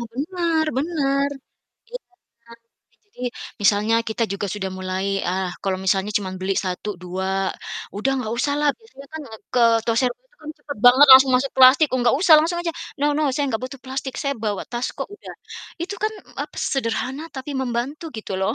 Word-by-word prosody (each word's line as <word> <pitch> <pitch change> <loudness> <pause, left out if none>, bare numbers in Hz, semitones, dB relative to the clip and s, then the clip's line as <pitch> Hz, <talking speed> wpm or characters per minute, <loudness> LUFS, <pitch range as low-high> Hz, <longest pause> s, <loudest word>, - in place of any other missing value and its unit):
Nah, 235 - -6
benar 330 +2 0
benar. 280 -2 0 0.6
Iya. - - -6 0.5
Ya 235 - -12 0.5
jadi, 410 - -19 0.4
misalnya 210 +3 +3
kita 225 +1 0
juga 200 +1 -3
sudah 195 -2 -4
mulai, 185 0 -3 0.2
ah 185 +1 -1
kalau 190 -1 -1
misalnya 190 +2 +1
cuma 195 -2 -5
beli 190 +1 -1
1, 185 +3 -4
2, 185 +1 -3 0.7
udah 240 +6 0
nggak 225 -3 -3
usahlah, 290 +2 +1
biasanya 280 - -15
kan, 315 - -5
eee, 220 - -13
ke 250 - +3 0.3
toserba 245 - +1
tuh - - -30
kan 305 - -6
cepet 285 -6 -8
banget 260 +4 +8
langsung 265 0 +9
masuk 265 +2 -1
plastik. 260 +4 +8
Oh - - +1
nggak 240 +2 +3
usah 350 -3 +7
langsung 335 +3 0
aja, 335 -1 -2 0.3
"No 285 - 0
no, 310 - +1
saya 290 - 0
nggak 225 0 -2
butuh 265 0 -8
plastik, 265 0 -5
saya 280 0 -1
bawa 205 -3 -1
tas 240 +1 -2
kok," 275 - -4
udah. - - -11 0.5
Itu 375 +4 -4
kan 430 0 +1 0.3
apa, - - -10 0.2
sederhana 260 +2 -2
tapi 265 +2 -6
membantu 255 +5 -3
gitu 215 -2 -6
loh. 195 +4 0
260 Hz, 185 wpm, -22 LUFS, 210-290 Hz, 0.7 s, langsung